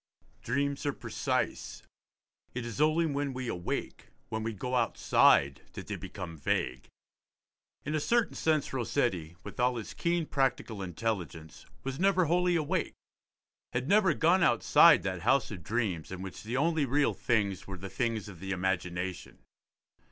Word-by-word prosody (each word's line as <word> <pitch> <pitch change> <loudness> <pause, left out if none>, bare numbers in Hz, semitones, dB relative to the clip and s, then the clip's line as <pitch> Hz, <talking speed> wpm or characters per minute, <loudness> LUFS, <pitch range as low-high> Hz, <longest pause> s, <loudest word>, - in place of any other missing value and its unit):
Dreams 140 +3 -1
are 140 - +1
precise; - - -3 0.7
it 125 -1 -3
is 120 +4 -4
only 155 +2 +3
when 140 -2 -1
we 130 -1 -4
awake, 90 -6 -4 0.2
when 110 0 -3
we 115 +1 -2
go 115 +5 -5
outside, 70 - +3
that - - -7
they - - -4
become 90 -4 -7
vague. 65 -1 -1 1.0
In 150 - -2
a 155 - +1
certain 235 +8 +1
sense 155 -4 0
Rossetti, 115 - -1
with - - -10
all 125 0 +2
his 115 -3 -6
keen 170 -1 0
practical 130 -7 -1
intelligence, 90 -4 -4 0.2
was 135 +1 -4
never 185 -1 +3
wholly 175 +2 +2
awake, 165 +2 -1 0.8
had 125 +2 -1
never 195 -3 +4
gone 175 +3 +3
outside 120 -9 +6
that 95 -3 -3
house 135 +8 +2
of 95 -5 -7
dreams 95 -3 -2
in 95 0 -6
which 95 - -8
the 115 +4 -3
only 160 +1 +2
real 140 +3 +2
things 100 -5 0
were 95 -1 -6
the 95 +3 -7
things 115 0 -2
of 95 -5 -10
the 95 - -7
imagination. 90 -1 -2
120 Hz, 155 wpm, -30 LUFS, 95-145 Hz, 1.0 s, outside